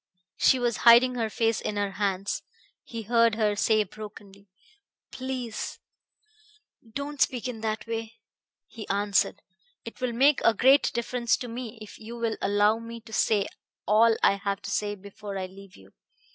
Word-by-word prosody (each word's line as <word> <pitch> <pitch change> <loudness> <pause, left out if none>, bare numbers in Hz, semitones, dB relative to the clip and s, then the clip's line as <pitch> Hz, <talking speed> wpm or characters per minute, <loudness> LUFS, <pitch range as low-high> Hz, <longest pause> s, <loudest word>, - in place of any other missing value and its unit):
She 260 - +5
was 240 -2 0
hiding 240 +2 +7
her 230 -3 -1
face 225 0 0
in 210 - -3
her 205 -1 -1
hands. 195 -1 -2 0.4
He 230 -1 -7
heard 230 0 +3
her 210 -2 +1
say 215 +1 +3
brokenly: 205 -1 -12 0.6
"Please... 255 -3 -5 1.1
don't 280 +3 -5
speak 255 0 +1
in 230 -3 -6
that 220 0 -2
way." 225 0 -5 0.5
He 220 -2 -10
answered: 200 0 +1 0.4
"It 230 - -10
will 250 -2 -1
make 275 +4 +4
a 230 - +4
great 270 +6 +5
difference 235 0 0
to 250 - -6
me 235 -1 -7
if 210 - -12
you 230 +2 -8
will 230 -1 -2
allow 205 +2 +3
me 230 0 -8
to 220 0 -14
say 205 -3 +2 0.4
all 225 +2 +5
I 200 - +5
have 200 0 -3
to 200 - -5
say 205 0 -1
before 200 0 -8
I 190 - -3
leave 195 +1 -13
you. 95 0 -18
220 Hz, 165 wpm, -27 LUFS, 205-235 Hz, 1.1 s, hiding